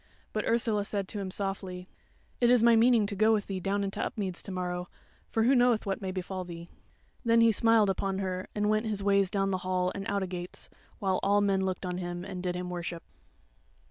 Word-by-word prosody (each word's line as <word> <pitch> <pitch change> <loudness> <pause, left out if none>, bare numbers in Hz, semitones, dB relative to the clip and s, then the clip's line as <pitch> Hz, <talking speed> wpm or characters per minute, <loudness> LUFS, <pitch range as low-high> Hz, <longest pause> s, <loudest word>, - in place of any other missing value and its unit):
But 215 - -1
Ursula 225 -3 +2
said 200 -1 -2
to 210 - -4
him 195 -1 -3
softly: 185 -2 -4 0.5
"It 240 - +4
is 245 -2 +5
my 235 -1 +7
meaning 230 -1 +5
to 200 0 -3
go 215 +3 +4
with 210 -2 0
thee 195 -2 -4
down 200 +2 -1
into 195 0 -2
Upmeads 190 -4 -3
to 200 - -7
morrow; 180 -1 -3 0.4
for 225 - +1
who 250 +4 +4
knoweth 245 -3 +3
what 195 0 -2
may 190 -1 -3
befall 185 0 -4
thee." 170 -1 -9 0.5
Then 230 -1 +4
he 230 0 +6
smiled 225 -1 +4
upon 195 0 -2
her 185 -1 -3
and 210 0 +1
went 215 +1 +1
his 205 -2 -2
ways 200 -1 +3
down 195 0 0
the 185 - 0
hall 185 0 0
and 195 0 -5
out 200 -1 0
a - - -1
gates, 180 -1 -7 0.3
while 190 -2 0
all 200 +1 +3
men 195 -1 +2
looked 185 0 -3
on 180 0 -3
him 175 0 -5
and 185 -2 -6
did 180 -1 -2
him 180 0 -4
worship. 175 -1 -5
195 Hz, 225 wpm, -29 LUFS, 185-215 Hz, 0.5 s, my